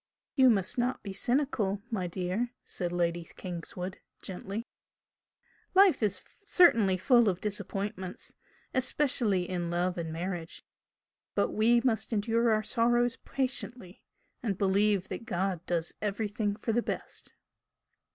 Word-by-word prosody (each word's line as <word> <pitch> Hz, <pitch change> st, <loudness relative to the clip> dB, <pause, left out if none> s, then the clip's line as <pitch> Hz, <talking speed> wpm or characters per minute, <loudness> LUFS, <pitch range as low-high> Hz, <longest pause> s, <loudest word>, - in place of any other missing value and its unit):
"You 260 Hz, -3 st, +7 dB
must 195 Hz, 0 st, +1 dB
not 250 Hz, +2 st, 0 dB
be 195 Hz, -, -5 dB
cynical, 215 Hz, -4 st, 0 dB
my 190 Hz, -5 st, -1 dB
dear!" 185 Hz, +7 st, -2 dB, 0.2 s
said 175 Hz, -1 st, -4 dB
Lady 175 Hz, -1 st, 0 dB
Kingswood, 180 Hz, +1 st, -6 dB, 0.2 s
gently 195 Hz, +4 st, -5 dB, 1.1 s
"Life 385 Hz, -5 st, +6 dB
is 205 Hz, -3 st, 0 dB, 0.2 s
certainly 230 Hz, -, +5 dB
full 235 Hz, +4 st, +5 dB
of 180 Hz, -2 st, -2 dB
disappointments, 200 Hz, -2 st, -4 dB, 0.4 s
especially 250 Hz, -8 st, +1 dB
in 175 Hz, -2 st, -2 dB
love 175 Hz, +1 st, 0 dB
and 165 Hz, -1 st, -3 dB
marriage 170 Hz, 0 st, -5 dB, 0.7 s
but -, -, +2 dB
we 235 Hz, +2 st, +4 dB
must 235 Hz, -2 st, 0 dB
endure 230 Hz, +2 st, +2 dB
our 215 Hz, 0 st, +2 dB
sorrows 240 Hz, +1 st, +2 dB
patiently 250 Hz, -7 st, -2 dB, 0.4 s
and 205 Hz, -6 st, -1 dB
believe 200 Hz, 0 st, +2 dB
that 230 Hz, -, -5 dB
God 185 Hz, -4 st, -1 dB
does 170 Hz, -1 st, -1 dB
everything 210 Hz, 0 st, -1 dB
for 225 Hz, -, -2 dB
the 240 Hz, -, +3 dB
best." -, -, -6 dB
205 Hz, 125 wpm, -30 LUFS, 180-235 Hz, 1.1 s, You